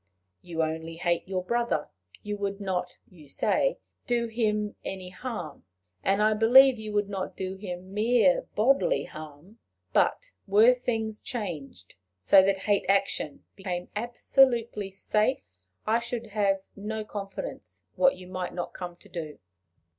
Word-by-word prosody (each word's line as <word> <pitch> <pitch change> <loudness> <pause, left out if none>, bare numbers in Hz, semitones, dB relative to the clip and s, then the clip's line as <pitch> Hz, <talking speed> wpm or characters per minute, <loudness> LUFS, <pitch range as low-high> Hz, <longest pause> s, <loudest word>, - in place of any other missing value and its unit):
You 165 -2 -2
only 160 +1 -3
hate 170 +1 0
your 185 -1 -2
brother; 235 -6 0 0.3
you 210 0 -3
would 200 0 -3
not, 180 -3 -3
you 160 -5 -16
say, - - +1 0.3
do 240 -1 +1
him 210 -2 -1
any 185 -1 -5
harm; 180 - -6 0.4
and 200 +2 +2
I 215 0 +4
believe 245 +3 +7
you 215 -1 -6
would 205 -1 +1
not 195 -2 -5
do 190 0 -3
him 185 -1 -7
mere 215 -3 +3
bodily 275 - +3
harm; 155 +8 -11 0.3
but, - - +2 0.2
were 215 +5 +7
things 225 -3 -2
changed, 160 - -6 0.3
so 190 - +7
that 195 0 +1
hate 205 -1 +2
action 195 -6 0
became 180 -2 -4
absolutely 235 -2 +2
safe, 210 +5 0 0.4
I 225 +2 +3
should 235 -2 -5
have 195 -2 +1
no 215 +1 -4
confidence 205 - -7
what 270 0 +4
you 185 - -11
might 185 -1 -4
not 175 - -4
come 175 -1 -6
to 190 - -19
do. 165 -5 -6
200 Hz, 145 wpm, -28 LUFS, 180-225 Hz, 0.4 s, believe